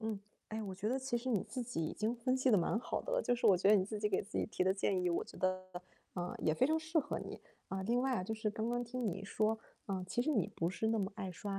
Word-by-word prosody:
嗯， 220 -2 -2 0.3
哎， 220 +1 -3
我 195 -3 -4
觉 200 +3 -2
得 260 +3 +1
其 260 -2 -1
实 250 +2 -5
你 215 -7 +2
自 255 - -4
己 230 -9 -2
已 - - -2
经 220 +3 0
分 255 +2 +1
析 260 0 +3
得 215 - +7
蛮 185 +4 +2
好 245 - -2
的 - - -4
了， - - +2
就 245 - +2
是 240 - +1
我 190 - +7
觉 185 +2 +3
得 210 - +8
你 185 - +3
自 210 +1 -4
己 210 - +1
给 195 - +1
自 210 - -4
己 - - +1
提 185 -3 0
的 190 - +4
建 195 -1 +1
议， 180 - +2
我 170 - 0
觉 - - -13
得， 185 0 +1 0.5
啊， 180 -1 -3
也 155 - +2
非 255 - +4
常 315 +2 +2
适 315 +1 0
合 290 -1 -1
你。 - - -7 0.3
啊， 190 0 -2
另 240 +4 +2
外 265 -1 +2
啊， 185 - -1
就 220 - -2
是 215 -1 -1
刚 220 +2 -2
刚 240 0 0
听 245 0 -3
你 195 +1 -4
说， 215 +2 +1 0.3
啊， 190 -2 -2
其 240 - 0
实 260 - +1
你 210 - +2
不 165 - 0
是 205 +5 -1
那 225 0 +2
么 195 -1 0
爱 190 -1 -4
刷 195 +3 -4
215 Hz, 335 characters per minute, -36 LUFS, 190-245 Hz, 0.5 s, 得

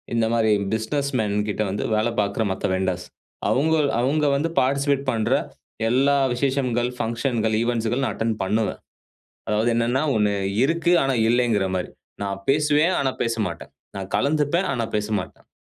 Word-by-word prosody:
இந்த 115 -1 +2
மாரி 110 -2 +3 0.2
business 140 +6 -2
man 105 -2 0
கிட்ட 105 - -2
வந்து 100 - -3
வேல 110 +2 +1
பார்க்குற 100 +2 -1
மத்த 95 - -3
வெண்டர்ஸ் 95 -1 -2 0.4
அவங்க 160 +5 +2 0.3
அவங்க 150 +4 +1
வந்து 155 +4 0
பார்டிசிபேட் 140 +1 +1
பண்ற, 110 -3 0 0.6
எல்லா 135 +4 +3 0.2
விசேஷங்கள், 125 -2 0
பங்ஷன்கள், 115 -1 -1
ஈவன்ட்ஸ்கள் 120 +2 0
நான் - - -1
அட்டெண்ட் 115 -1 -1
பண்ணுவேன். 110 +3 -1 0.7
அதாவது 110 +3 +1
என்னன்னா, 120 +4 +1
"ஒன்னு 105 -1 +2 0.3
இருக்கு 170 +4 +1
ஆனா 135 -1 +1
இல்ல" 120 +2 +3
ங்கிற 105 -3 +2
மாரி. 90 - -3 0.3
நான் 100 -1 -3
பேசுவேன் 150 +4 +3
ஆனா 135 -1 +1
பேச 115 -1 0
மாட்டேன். 85 -2 -7 0.3
நான் 95 -1 -6
கலந்துப்பேன் 150 - +1
ஆனா 120 -3 -1
பேசமாட்டேன். 105 -2 -3
120 Hz, 150 wpm, -23 LUFS, 110-140 Hz, 0.7 s, மாரி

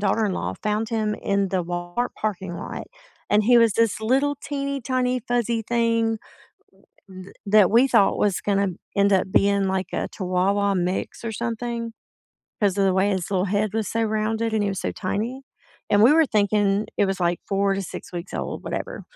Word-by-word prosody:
daughter-in-law 205 -1 0
found 215 +1 -1
him 215 -2 -1
in 200 -2 0
the 185 -2 0
Walmart 175 +7 -3
parking 190 -4 -3
lot, - - -6 0.4
and 210 0 +4
he 240 +2 +6
was 230 -2 +4
this 230 -2 +1
little, 270 +6 +1
teeny, 280 -1 -3
tiny, 255 0 0
fuzzy 235 -1 0
thing 230 -1 +1 0.9
th 185 +1 -11
that 205 -2 +5
we 240 +4 +5
thought 200 - +3
was 200 -3 +1
gonna 200 -1 +1 0.3
end 200 0 +3
up 190 0 +1
being 200 0 +3
like 190 -1 -1
a - - -2
chihuahua 195 +2 +1
mix 180 +4 -2
or 225 - -2
something, 230 +1 -4 0.7
'cause 200 -2 +1
of 195 - +3
the 190 - +2
way 190 +2 +2
his 185 -3 -2
little 190 -1 +1
head 205 +2 0
was 220 -3 -1
so 230 - -1
rounded 220 +1 -1
and 215 - +1
he 205 - 0
was 195 - -4
so - - -2
tiny, 225 +7 -3 0.5
and 205 0 +5
we 250 +6 +7
were 325 0 +5
thinking 205 -2 +1
it - - +3
was, 195 -1 -2
like, 175 0 +1
4 195 0 +1
to 195 - -2
6 185 - -8
weeks 175 +2 -6
old, - - -4
whatever. - - -5
210 Hz, 190 wpm, -23 LUFS, 195-230 Hz, 0.9 s, we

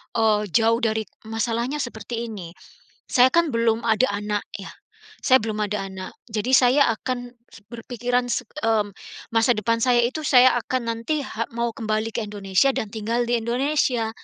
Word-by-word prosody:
eee, 220 -2 +3
jauh 230 0 +3
dari 220 -2 0 0.2
masalahnya 230 +4 -1
seperti 235 0 -5
ini, 180 -6 -8 0.5
saya 250 0 +5
kan 335 -3 +2
belum 230 0 +1
ada 225 +4 +3
anak 205 0 -2 0.2
ya, 195 - -8 0.6
saya 260 - +6
belum 215 -1 -2
ada 200 -1 -3
anak. 190 -1 -7 0.2
Jadi 220 +1 -3
saya 260 +2 +5 0.2
akan 245 -1 -4 0.2
se - - -14
berpikiran 245 +1 -2
se 245 - 0 0.2
mmm, 220 -2 +2 0.4
masa 225 +2 +3
depan 230 +2 0
saya 245 -1 +4
itu 260 +6 -1
saya 255 -3 +6
akan 255 +2 -2
nanti 230 +7 -2
ha 230 -4 -4
mau 235 0 -1
kembali 215 0 -2
ke - - -1
Indonesia 200 +4 +1
dan 215 - -3
tinggal 225 +3 -1
di 240 0 +1
Indonesia. 245 -1 0
230 Hz, 165 wpm, -23 LUFS, 215-245 Hz, 0.6 s, saya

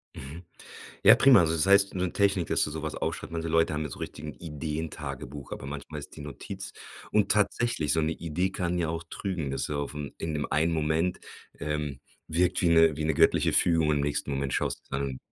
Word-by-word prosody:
Mhm, 75 +6 -9 0.6
ja, - - +9
prima. 130 -5 +7
Also 80 -1 +2
das 80 0 +1
heißt, 100 0 +5
in 95 - -4
so 90 - +2
Technik, 95 -2 +1
dass - - +2
du - - -4
sowas 80 0 -4
aufschreibt. - - -4
Manche 80 0 -3
Leute 80 -1 +2
haben 75 - -1
ja 75 - -3
so - - -9
richtig 75 - -7
'n 75 - -6
Ideentagebuch, 75 -3 -6
aber - - -6
manchmal 75 +2 -6
ist 70 - -9
die - - -9
Notiz 75 -1 -7 0.4
und 105 -1 +2
tatsächlich, 105 -4 +1
so 80 - +2
'ne 80 +1 0
Idee 85 +4 -2
kann 90 -1 -2
ja 85 -2 0
auch 80 +1 -3
trügen, 90 -8 -3
dass 70 - -2
du 75 - -4
aufm 70 0 -4
in 80 -1 -3
dem 75 - -1
einen 80 +3 +2
Moment 80 +3 0 0.4
ähm, 75 -2 -3 0.3
wirkt 90 +3 +1
wie 85 - +4
'ne 80 -2 +5
wie 75 - -2
'ne 80 0 +1
göttliche - - +4
Fügung, 80 -3 +3
im 75 -1 +2
nächsten 70 0 -1
Moment 70 0 -2
schaust - - -2
du - - -3
dann 70 -2 -3
80 Hz, 220 wpm, -28 LUFS, 75-85 Hz, 0.6 s, ja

